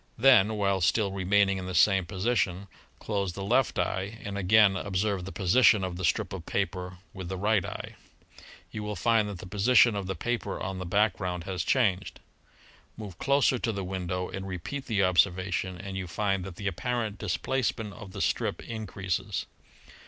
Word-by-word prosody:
Then, 110 -4 +5
while 100 -2 +1
still 100 +4 +2
remaining 95 +1 +2
in 90 - -6
the 95 - -4
same 95 0 +4
position, 100 -1 -1 0.3
close 100 -4 -2
the 100 - -6
left 120 +5 +2
eye 100 +4 -2
and 100 0 -5
again 100 +1 +5
observe 95 -1 -1
the 95 - -6
position 105 +1 +4
of 90 -1 -3
the 95 - -6
strip 85 - 0
of - - -7
paper 90 0 -2 0.2
with 95 -3 -7
the 95 - -3
right 105 0 +2
eye. - - -7 0.8
You 110 - -5
will 105 0 -4
find 115 -2 +2
that 100 - -6
the 85 - -9
position 110 +4 +4
of 100 -2 -3
the 95 - -3
paper 120 +7 -3
on 95 -2 -4
the 90 - -5
background 90 -3 0
has 90 -2 -3
changed. 100 -8 +1 0.8
"Move 100 -5 -9
closer 140 -2 +2
to 115 - -1
the 100 -2 -4
window 90 -1 -3
and 95 0 -6
repeat 95 - -5
the 105 -5 +1
observation, 90 0 +1
and 95 +1 -7
you 95 -1 -4
find 95 +2 -1
that 95 -3 -8
the 100 - -8
apparent 110 +3 -2
displacement 110 +1 -2
of 95 -1 -10
the - - -6
strip - - -1
increases. 100 -5 -3
100 Hz, 180 wpm, -28 LUFS, 95-110 Hz, 0.8 s, Then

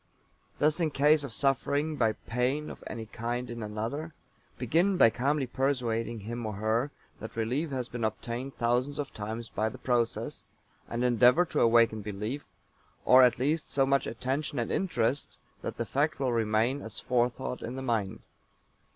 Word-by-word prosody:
Thus 150 +3 +2
in 165 -2 +2
case 150 +1 +4
of 140 - -6
suffering 140 +4 0
by 115 -5 +2
pain 130 +8 -2
of - - -11
any 115 -2 -5
kind 120 +2 -4
in 120 -1 -6
another, 115 +10 -4 0.4
begin 170 - +2
by 115 - +7
calmly 140 +4 0
persuading 120 -4 -1
him 120 +3 -5
or 110 -1 -3
her 110 +6 0 0.3
that 110 - -8
relief 125 +8 -1
has 130 -3 -3
been 120 -2 -5
obtained 120 +4 -3
thousands 125 +4 +1
of 145 -2 -4
times 110 +2 -5
by 110 +1 0
the - - -10
process, 120 -2 -1 0.5
and 120 +1 -2
endeavor 125 +7 +5
to - - -2
awaken 115 -2 +4
belief, 105 +7 -4 0.6
or, 130 +1 +8
at 125 -1 +5
least, 150 +5 0
so 135 -1 +2
much 140 0 +2
attention 135 +5 -2
and 120 -2 -1
interest 140 -7 0 0.2
that - - -5
the - - -1
fact 150 +3 0
will 130 -3 +1
remain 115 +4 +1
as 110 -1 -7
forethought 125 0 -1
in 120 - -5
the 135 - -5
mind. 110 -6 -1
125 Hz, 170 wpm, -29 LUFS, 115-140 Hz, 0.6 s, or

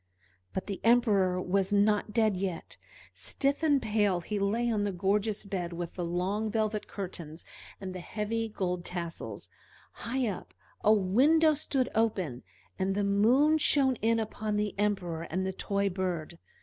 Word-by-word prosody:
But 190 - -3
the 200 -2 -5
Emperor 210 -6 +3
was 190 +2 0
not 205 +1 +2
dead 220 -3 +2
yet: 185 -3 -4 0.4
stiff 280 +2 0
and 295 -3 +4
pale 210 -6 +1
he 205 +4 -3
lay 215 +5 +1
on 210 -2 0
the 205 - 0
gorgeous 205 +3 0
bed 180 -3 -3
with 170 0 -5
the 180 - -4
long 185 +6 -1
velvet 215 -1 -1
curtains 170 -5 -7 0.3
and 190 -1 -6
the 185 - -6
heavy 220 +4 -3
gold 180 -4 -2
tassels; 170 -2 -5 0.4
high 255 +2 -2
up, 200 - -6 0.3
a 210 - +5
window 265 +11 +4
stood 275 -3 -1
open, 190 - 0 0.4
and 190 +1 0
the 205 - +1
moon 245 +11 +4
shone 275 -3 +4
in 230 +1 +2
upon 215 -1 -3
the 210 0 0
Emperor 190 -6 0
and 185 +3 -1
the 190 - -2
toy 200 +1 -1
bird. 175 -3 -3
205 Hz, 160 wpm, -30 LUFS, 185-225 Hz, 0.4 s, a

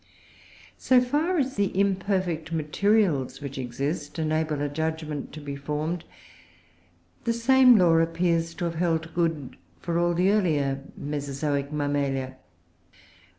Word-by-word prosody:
So 255 -1 +5
far 295 +9 0
as 265 -5 -1
the 200 -1 +2
imperfect 185 -4 0
materials 160 - +1
which 140 -2 -6
exist 140 +6 -4
enable 155 -1 0
a - - 0
judgment 155 0 -3
to 155 - -7
be 145 -1 -6
formed, 150 +4 -3 1.2
the 230 - +2
same 250 +1 +6
law 175 -4 +5
appears 165 0 0
to 175 - -3
have 170 - -2
held 165 -1 -1
good 165 -6 -1 0.2
for 170 0 -1
all 175 0 +1
the 185 +3 +3
earlier 145 -9 +1 0.2
Mesozoic 140 0 -3
Mammalia. 140 -3 -1
160 Hz, 125 wpm, -26 LUFS, 145-185 Hz, 1.2 s, same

